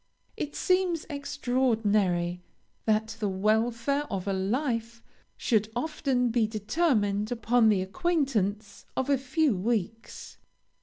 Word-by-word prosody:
It 295 - -5
seems 365 -3 +1
extraordinary 220 -11 0 0.4
that 220 0 0
the 210 -2 0
welfare 230 +8 +1
of 195 -1 -3
a 195 - +1
life 230 +3 -2 0.3
should 215 -2 +1
often 260 -3 0
be 230 -1 +2
determined 215 - 0
upon 235 0 +3
the 195 -3 +2
acquaintance 215 - -1
of 265 +2 0
a 280 - +4
few 270 -1 +1
weeks. 225 +2 -3
230 Hz, 110 wpm, -28 LUFS, 205-275 Hz, 0.4 s, a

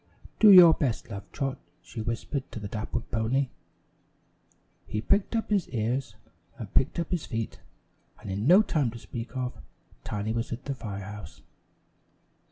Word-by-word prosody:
"Do 215 - +8
your 175 -4 +10
best, 125 -6 -2
Love 100 -1 -8
Trot," 135 -2 -3 0.2
she 110 - -7
whispered 115 +5 -3
to - - -6
the 105 - -5
dappled 110 +3 -4
pony. 125 +4 +1 1.4
He 105 - -2
pricked 200 - +1
up 225 -1 -1
his 200 -4 +1
ears, 120 0 -2 0.4
and 105 -4 -8
picked 135 - +2
up 170 -1 -2
his 175 -4 -1
feet, 115 -1 -4 0.6
and 100 - -7
in 100 +5 -1
no 185 +6 +8
time 150 - +1
to 115 - -8
speak 120 +2 -7
of 125 -1 -2 0.5
Tiny 105 +1 -2
was 115 0 -2
at 120 +3 -5
the 140 - -2
fire 100 -6 -6
house. 105 0 -10
120 Hz, 165 wpm, -28 LUFS, 110-140 Hz, 1.4 s, your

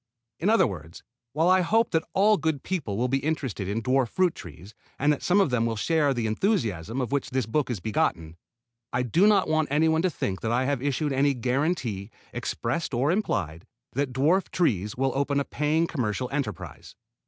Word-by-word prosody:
In 190 - +1
other 225 - +5
words, 85 -7 -7 0.3
while 160 +4 +2
I 185 0 +5
hope 225 +7 +2
that 160 0 +1
all 210 +3 +5
good 155 -4 -1
people 145 - -3
will 125 +3 +1
be 135 +2 +1
interested 135 -9 -3
in 110 +3 -2
dwarf 130 0 +2
fruit 180 +5 +1
trees 85 +5 -11 0.2
and 145 +2 +3
that 145 - -5
some 180 +3 +3
of 190 -9 +2
them 115 -2 +1
will 115 - -2
share 150 +5 +1
the 120 -4 -1
enthusiasm 110 - -1
of 120 - -3
which 140 -1 -1
this 130 -2 -1
book 130 +6 -1
is 120 -5 -2
begotten, 85 -5 -1 0.6
I 125 +1 0
do 165 - +3
not 205 -3 +4
want 155 -1 +1
anyone 160 +2 +2
to 185 - +2
think 95 - -3
that 110 - -1
I 125 +2 +1
have 140 -2 -1
issued 145 +1 -1
any 140 +1 +2
guaranty, 125 - -1 0.2
expressed 130 +4 -3
or 135 +6 +2
implied, 90 - -2 0.3
that 140 0 -1
dwarf 155 +9 +2
trees 105 - 0
will 135 +1 +1
open 140 +1 0
a 140 - -1
paying 155 +3 0
commercial 125 - -2
enterprise. 135 - -5
135 Hz, 200 wpm, -26 LUFS, 115-160 Hz, 0.6 s, other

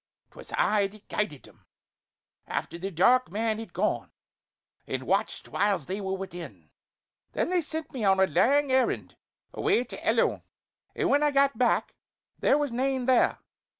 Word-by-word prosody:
'Twas - - -12
I 205 -2 +2
that 210 +1 -17
guided 195 -10 -2
them, - - -20 0.8
after 170 - -4
the 190 +2 -3
dark 245 +9 +3
man 220 +2 -1
had 225 -5 -8
gone; 200 +5 -1 0.8
and - - -3
watched - - -1
whiles 200 -7 0
they 195 +5 -4
were 190 -1 -2
within. 165 - -9 0.6
Then - - -1
they 360 -1 +2
sent 315 0 -4
me 250 -5 -4
on 190 -1 +4
a 190 - +6
lang 280 +7 +2
errand 260 -1 +1 0.4
away 240 - +1
to 250 - -10
Ellon; - - +2 0.5
and - - 0
when 285 - +3
I 300 - +4
got 275 -2 +3
back 245 +2 +1 0.5
there - - +3
was 290 -3 -1
nane 260 +1 -1
there. 260 -1 +3
220 Hz, 160 wpm, -27 LUFS, 190-270 Hz, 0.8 s, a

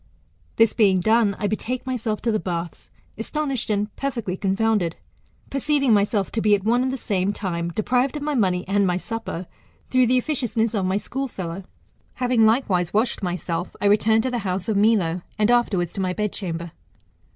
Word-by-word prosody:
This 225 -1 +4
being 195 -5 +4
done, 220 +1 +3
I - - -3
betake 235 +5 -2
myself 230 -4 -2
to 235 - +1
the 215 - +1
baths, 170 -3 -5 0.3
astonished 275 0 -2
and 210 0 -1
jjerfectly 235 -9 -3
confounded; 195 -3 +1 0.6
perceiving 275 -2 +2
myself 205 -1 +1
to 225 - -1
be 210 -1 +5
at 195 - -4
one 235 +3 +2
and 260 0 0
the 265 - -3
same 200 -4 0
time 170 -4 -3
deprived 250 - 0
of 290 - -5
my 300 0 -1
money 185 -8 +1
and 200 0 +2
my 180 0 +1
supper, 205 -3 -5 0.5
through 255 -1 +4
the 255 +2 +3
officionsness 240 -5 -1
of 200 -4 0
my 190 +1 +1
school 270 +6 -3
fellow. 185 -4 -6 0.5
Having 245 -3 +3
likewise 205 -7 +1
washed 230 +3 +1
myself, 175 -1 -3
I - - -2
returned 220 +2 +4
to 255 - -1
the 245 - -1
house 185 -3 -3
of 220 - 0
Milo; 200 -5 +2 0.2
and 215 +2 +3
afterwards 200 -8 +1
to 195 - -3
my 185 -1 0
bedchamber. 180 -5 -3
210 Hz, 185 wpm, -23 LUFS, 185-240 Hz, 0.6 s, be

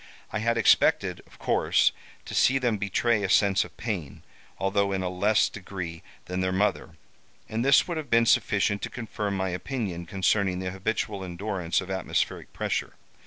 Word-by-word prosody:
I 110 - 0
had 115 +2 +1
expected, 115 - +3
of - - -19
course, - - +2 0.3
to - - -8
see 135 - +4
them 120 -5 0
betray 105 +3 +1
a 100 - -1
sense 100 0 +4
of - - -14
pain, 95 - -4 0.3
although 100 +1 +1
in 95 -1 -1
a 90 - -1
less 100 +4 +2
degree 90 -4 -7 0.2
than 90 +1 -3
their 95 0 0
mother, 95 -4 -1 0.5
and 110 +2 -2
this 140 0 +5
would 170 -2 -3
have 150 -4 -5
been 115 0 +4
sufficient 100 -2 +2
to - - -3
confirm 105 -5 -4
my 95 0 -1
opinion 90 -3 -4
concerning 95 0 +1
the 90 0 -3
habitual 100 +1 -2
endurance 90 -1 -2
of 95 +1 -7
atmospheric 95 -2 -2
pressure. - - -2
100 Hz, 170 wpm, -27 LUFS, 95-110 Hz, 0.5 s, this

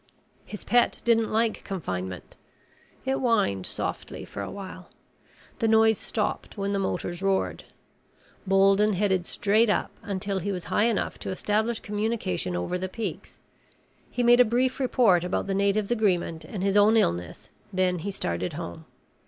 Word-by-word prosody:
His 210 - -8
pet 240 +2 +3
didn't 230 -1 +3
like 225 0 0
confinement. 95 - -5 0.7
It 265 - +1
whined 205 - +1
softly - - -4
for - - -7
a - - -4
while. 190 -2 -9 0.7
The 225 - +2
noise 220 -1 +4
stopped 215 0 -3
when 200 0 -1
the 200 - 0
motors 175 -2 -3
roared. 195 -1 0 0.8
Bolden 195 +2 +4
headed 190 -2 +1
straight 215 +3 +2
up, - - 0
until 200 -1 -2
he 200 +3 -2
was 180 -3 -4
high 210 - +4
enough 230 -3 -1
to - - -5
establish 215 +4 0
communication 210 - -2
over 90 - -2
the 185 +1 -3
peaks. 225 +4 -6 0.7
He 245 - -1
made 240 +1 +6
a - - +9
brief 250 +3 0
report 235 -9 +3
about 180 - -1
the 195 - -2
natives' 200 +2 +1
agreement 180 -7 0
and 190 -3 -5
his 195 0 +1
own 210 +2 +6
illness, 85 - -1 0.2
then 185 -1 +1
he 200 - -4
started 90 - -3
home. 85 -2 -7
200 Hz, 155 wpm, -26 LUFS, 180-220 Hz, 0.8 s, a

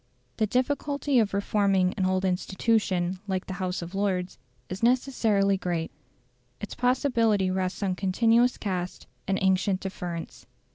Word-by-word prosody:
The 215 - +1
difficulty 280 +3 +1
of 215 -3 +1
reforming 200 -2 +1
an 190 -3 0
old 185 0 0
institution 185 -1 0
like 190 -2 -2
the 190 - -5
House 180 -1 -2
of 170 +2 -9
Lords 190 -2 -1 0.3
is 185 +2 -6
necessarily 230 -5 +2
great; 175 -3 -2 0.7
its 210 - -6
possibility 235 -6 +2
rests 185 +1 -2
on 190 -2 +1
continuous 230 +6 +2
caste 185 -3 -4 0.2
and 195 0 +1
ancient 190 0 +2
deference. 175 -6 -6
195 Hz, 135 wpm, -27 LUFS, 185-225 Hz, 0.7 s, necessarily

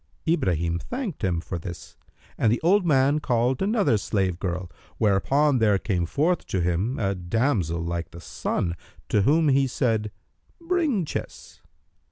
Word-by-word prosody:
Ibrahim 85 - +1
thanked 240 - -5
him 90 -3 +1
for 90 0 -5
this 85 +1 -9 0.4
and 110 - +2
the 120 - +1
old 185 +2 +3
man 140 0 +3
called 125 -2 0
another 200 - +2
slave 95 -4 -1
girl, 90 -1 -3 0.3
whereupon 130 +7 +2
there 105 -3 +4
came 90 -4 -1
forth 160 - 0
to 95 - -1
him 90 +8 0
a 100 -2 0
damsel 90 - 0
like 85 0 -3
the 85 - -11
sun, 85 0 -2 0.3
to 105 - +3
whom 145 +4 +3
said 115 -5 0 0.5
he, 335 - -20
"Bring 315 - +1
chess." - - -7
110 Hz, 150 wpm, -25 LUFS, 90-150 Hz, 0.5 s, there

